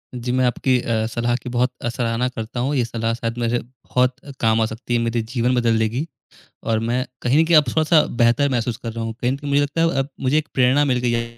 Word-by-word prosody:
जी, 125 0 -3
मैं 130 0 +2
आपकी 125 +1 +1
अ, 110 -2 -1
सलाह 120 +1 -1
की - - -6
बहुत 125 +1 +1
अ, 120 - -1
सराहना 115 +1 -1
करता 115 0 -6
हूँ। 135 +4 0
ये 125 - +2
सलाह 115 -1 -2
शायद 115 0 -4
मेरे 120 0 0
बहुत 125 +1 -1
अ, 145 - -8
काम 110 0 +2
आ - - +3
सकती 120 +2 -5
है, 120 - +3
मेरे 115 0 0
जीवन 120 +2 0
बदल 115 -2 +2
देगी, 115 +7 -1 0.6
और 110 -1 0
मैं 125 +2 0 0.2
कहीं 125 +5 +2
न - - +2
कहीं 165 -1 +5
अब 150 - +6
थोड़ा-सा 155 +2 +4 0.2
बेहतर 120 +5 +3
महसूस 120 -2 -1
कर 115 - -6
रहा 115 0 -4
हूँ। 115 0 -4
कहीं 125 - +1
न 135 - -2
कहीं 145 0 -6
मुझे 140 0 +3
लगता 145 +3 -1
है 165 -5 +2 0.2
मुझे 135 +3 +2
एक 155 0 0
प्रेरणा 130 +3 +3
मिल 130 -3 +1
गई 125 -1 0
है 115 0 -3
120 Hz, 260 wpm, -21 LUFS, 115-130 Hz, 0.6 s, अब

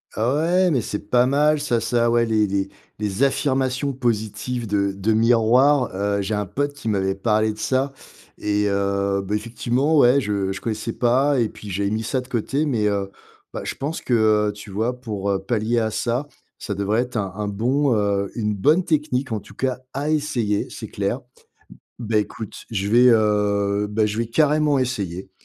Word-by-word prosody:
Ouais, 165 +10 +2
mais 135 - +2
c'est 105 -1 -6
pas 125 0 +4
mal 150 +3 +3
ça 120 -6 0
ça, 120 +1 +1
ouais 120 0 +3
les 110 -2 +2
les 100 0 -1 0.3
les 105 +3 -1
affirmations 135 0 +1
positives 120 -1 -2
de 100 -2 0
de 100 +3 -1
miroir, 120 +4 +4
heu. 100 +1 -1
J'ai 100 +3 -3
un 105 0 -1
pote 145 +9 -2
qui 145 -5 -9
m'avait 95 -3 +1
parlé 110 +2 +1
de 105 - -10
ça 130 +4 0 0.5
et 105 0 0
heu, 100 0 0
bah, 100 +2 -2
effectivement, 120 +7 0
ouais, 135 0 +5
je 100 -3 -1
je 100 - -7
connaissais 110 0 -3
pas 135 +4 +2
et 115 -2 +1
puis 105 - -11
j'avais 100 +2 -1
mis 110 +2 -2
ça 130 +4 -1
de 125 - -14
côté, 135 +5 -1
mais 115 -8 +1
heu, 100 -1 -1 0.4
bah, - - -4
je - - -4
pense 150 +4 -4
que, 125 - -2 0.4
heu, - - -4
tu 105 0 -11
vois, 115 +5 -2
pour, 105 -5 -4
heu, 100 -1 +1
pallier 115 +2 0
à 110 -1 -1
ça, 120 +5 -1 0.3
ça 105 - -4
devrait 100 +3 0
être 125 -1 -4
un 100 -3 -2
un 105 0 -3
bon, 125 +7 +1
heu, 100 -2 0
une 105 -2 -1
bonne 155 - +3
technique, 145 -4 0
en 105 - -2
tout - - -16
cas 130 -1 -1
à 145 +2 -2
essayer, 130 -9 0
c'est - - -8
clair. - - -2 0.8
Beh, 115 -2 0
écoute 105 +1 -7
je 100 -3 -2
vais, 120 +4 +6
heu, 105 -2 +2
beh, 110 +1 +2
je 105 0 -3
vais 115 +1 -1
carrément 150 +3 +2
essayer, 100 -8 -3
115 Hz, 195 wpm, -22 LUFS, 105-130 Hz, 0.8 s, vais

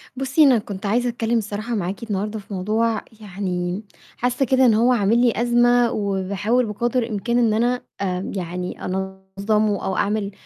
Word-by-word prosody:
بُصّي 270 +4 +2
أنا 265 -4 +6
كنت 205 -2 -6
عايزة 240 +5 +1
أتكلّم 235 0 0
الصراحة 215 +2 -3
معاكِ 195 +3 -3
النهارده 210 0 -3
في 200 0 -10
موضوع 215 +3 0 0.2
يعني، 185 -1 -3 0.3
حاسّة 250 +2 0
كده 260 +1 +3
إن 235 - +5
هو 235 +4 +4
عامل 215 -1 +2
لي 240 -2 +4
أزمة 240 0 +3
وباحاول 200 +4 0
بقَدر 240 +3 -1
الإمكان 225 +1 -1
إن 230 -3 +3
أنا 245 +3 +1 0.2
آمم 185 -1 -2
يعني 180 -1 -5
أنظّمه 190 +2 -1
أو 190 - -1
أعمل 205 0 0
215 Hz, 160 wpm, -22 LUFS, 195-240 Hz, 0.3 s, أنا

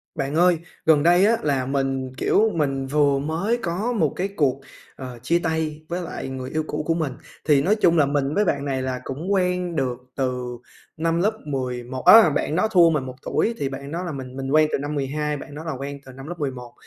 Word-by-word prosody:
Bạn 140 +2 -2
ơi, 175 +1 +4 0.3
gần 155 -2 +5
đây 175 +3 +5
á 230 +2 +4
là 135 -4 0
mình, 135 -1 -2
kiểu, 220 +9 +3
mình 135 -4 -1
vừa 140 0 +2
mới 165 +11 -1
có 190 +8 -1
một 160 - +1
cái 190 +2 -1
cuộc, 140 -9 0 0.4
ờ, 125 -2 -8
chia 170 +7 +2
tay 160 -1 -2
với 175 +1 -3
lại 170 - -6
người 130 -1 -6
yêu 155 - -1
cũ 150 0 -3
của 165 - +2
mình, 160 -5 -2 0.3
thì 145 -3 +4
nói 205 +8 +2
chung 170 -5 +3
là 145 - +5
mình 140 0 0
với 210 - +3
bạn 140 -5 0
này 135 -2 -1
là 130 -1 -3
cũng 160 +9 -4
quen 180 -3 0
được 125 -2 -1 0.2
từ 125 -2 -2 0.4
năm 165 +1 0
lớp 210 +5 +2
11 130 -2 -4
á, 220 -7 +9
bạn 150 +2 -1
đó 215 +5 +2
thua 175 -5 +6
mình 150 -4 0
1 130 - -7
tuổi 230 - 0
thì 140 - -1
bạn 140 +1 -7
đó 170 +2 -3
là 175 - -4
mình 130 -2 -7
mình 135 0 -4
quen 155 +1 +4
từ - - +1
năm 145 +2 -4
12 150 +2 -2
và - - -8
bạn 145 - -10
đó 155 +2 -7
là 160 - -3
quen 140 +1 -6
từ 130 - -10
năm 135 +2 -10
lớp 175 +2 -7
11, 130 -5 -5
145 Hz, 240 wpm, -23 LUFS, 135-170 Hz, 0.4 s, á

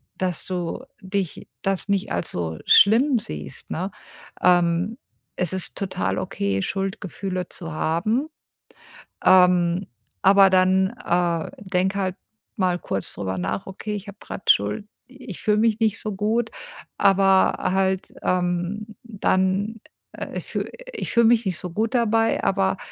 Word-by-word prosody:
dass 180 -3 -2
du 180 -3 -4 0.2
dich 190 -2 -3 0.2
das 195 +1 -1
nicht 200 +1 0
als - - -2
so 80 -2 -4
schlimm 240 +6 +6
siehst, 75 - -6
ne? 185 +4 -2 0.5
Ähm, 175 +4 +3 0.4
es 180 -2 -1
ist 190 -1 -2
total 95 - -2
okay, 100 -1 -1
Schuldgefühle 190 - -3
zu 165 -3 -6
haben. 205 - 0 1.0
Ähm, 180 0 +5 0.4
aber 195 0 +7
dann, 185 +1 +3
äh, 170 -2 0
denke 190 0 -1
halt 185 -1 -1 0.4
mal 185 -3 +1
kurz 95 - -4
darüber 95 -1 -3
nach: 90 - -3
„Okay, 210 +2 -5
ich 205 0 -6
habe 200 - -9
grad - - -3
Schuld 105 - +2 0.3
Ich 250 -8 -9
fühle 210 -1 +2
mich 225 -1 +2
nicht 220 0 +1
so 215 -2 -4
gut, 220 +3 0 0.5
aber 195 -1 +4
halt, 190 0 0
ähm, 180 +4 -1
dann, 200 0 0 0.3
äh, - - -6
ich - - -6
fühl - - -3 0.2
ich - - -4
fühle 235 -1 +5
mich 235 0 +4
nicht 180 -4 -1
so 180 - -5
gut 220 +7 -1
dabei, 225 -1 +2
aber 195 -1 +1
190 Hz, 140 wpm, -23 LUFS, 175-210 Hz, 1.0 s, aber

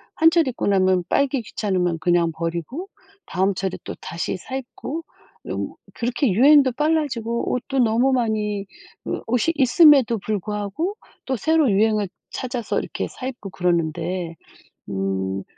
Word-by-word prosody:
한철 325 -1 +4
입고 250 - -2
나면 185 -2 +3
빨기 280 -2 +2
귀찮으면 185 -6 -1
그냥 175 -1 +2
버리고 170 - -4 0.4
다음 195 +1 +1
철에 190 0 -3
또 - - -6
다시 170 +3 -3
사 260 +8 -7
입고 270 +5 -6 0.4
이런 - - -4 0.2
그렇게 245 +3 0
유행도 270 +3 +6
빨라지고 260 -6 0
옷도 265 +2 -2
너무 240 +2 +3
많이 215 -5 0 0.4
그 - - -3
옷이 250 +8 +1
있음에도 270 -3 +6
불구하고 210 - -3 0.3
또 260 -1 -1
새로 315 -1 +3
유행을 210 -1 +2 0.2
찾아서 245 -3 -2
이렇게 - - -4
사 255 - -7
입고 240 -6 -6
그러는데 170 0 -1 0.5
음 95 0 -2
220 Hz, 295 characters per minute, -22 LUFS, 185-265 Hz, 0.5 s, 유행도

